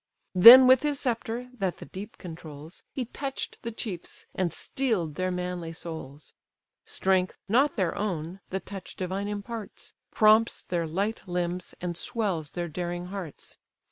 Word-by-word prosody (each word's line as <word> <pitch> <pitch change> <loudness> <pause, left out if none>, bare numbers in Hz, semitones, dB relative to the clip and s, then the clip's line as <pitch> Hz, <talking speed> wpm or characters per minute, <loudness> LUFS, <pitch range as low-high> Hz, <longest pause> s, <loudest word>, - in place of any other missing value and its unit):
Then 235 +8 +11
with 255 0 +7
his 290 -1 -1
sceptre, 240 0 -2
that 195 -7 -2
the - - -9
deep 200 +2 -9
controls, 160 -2 -10
He 255 - -3
touch'd 270 +3 -5
the 235 - -4
chiefs, 200 -6 -6
and 185 -3 0
steel'd 205 - -1
their 185 +4 -1
manly 180 -2 -3
souls: 160 -4 -8 0.5
Strength, 185 -1 +1
not 265 +8 +3
their 185 -6 0
own, 180 -3 -3
the 190 - -2
touch 195 -1 -9
divine 190 +2 -3
imparts, 210 +1 -6 0.2
Prompts 220 +1 +4
their 170 -2 -2
light 200 +7 -1
limbs, 175 0 -3
and 175 -1 -3
swells 195 - -2
their 175 0 -1
daring 175 +2 -4
hearts. 185 -7 -8
190 Hz, 145 wpm, -27 LUFS, 175-225 Hz, 0.5 s, Then